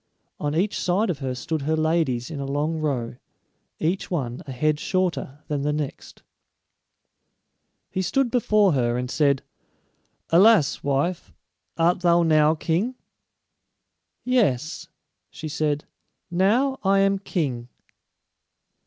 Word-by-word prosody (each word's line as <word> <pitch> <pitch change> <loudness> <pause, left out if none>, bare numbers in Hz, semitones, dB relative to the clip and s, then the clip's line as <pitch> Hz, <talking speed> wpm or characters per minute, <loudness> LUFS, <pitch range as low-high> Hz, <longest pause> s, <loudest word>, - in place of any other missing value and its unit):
On 145 0 -2
each 195 +5 0
side 185 +3 +1
of 150 - -6
her 130 -2 -3
stood 155 +4 -3
her 155 +3 0
ladies 155 -5 0
in 150 - -5
a 140 - -3
long 150 +3 -1
row, 125 -6 -2 0.6
each 175 +5 -1
one 130 -8 -3
a - - -5
head 150 +4 0
shorter 175 -7 -2
than 145 -2 -2
the 150 +1 0
next. 150 -2 -5 1.7
He 185 - -1
stood 260 +6 0
before 215 -5 +3
her, 120 -3 +1
and 125 +1 -3
said, 140 -3 +2 0.9
"Alas, 185 -2 +5
wife, 145 +6 -1 0.5
art 170 +2 +3
thou 175 -1 +4
now 155 -1 +4
king?" 180 +11 -1 1.3
"Yes," 195 - 0 0.4
she 155 - -7
said; 150 -1 -1 0.5
"now 235 +10 +2
I 195 0 +3
am 195 0 +3
king." 135 -11 -3
155 Hz, 125 wpm, -24 LUFS, 140-185 Hz, 1.7 s, Alas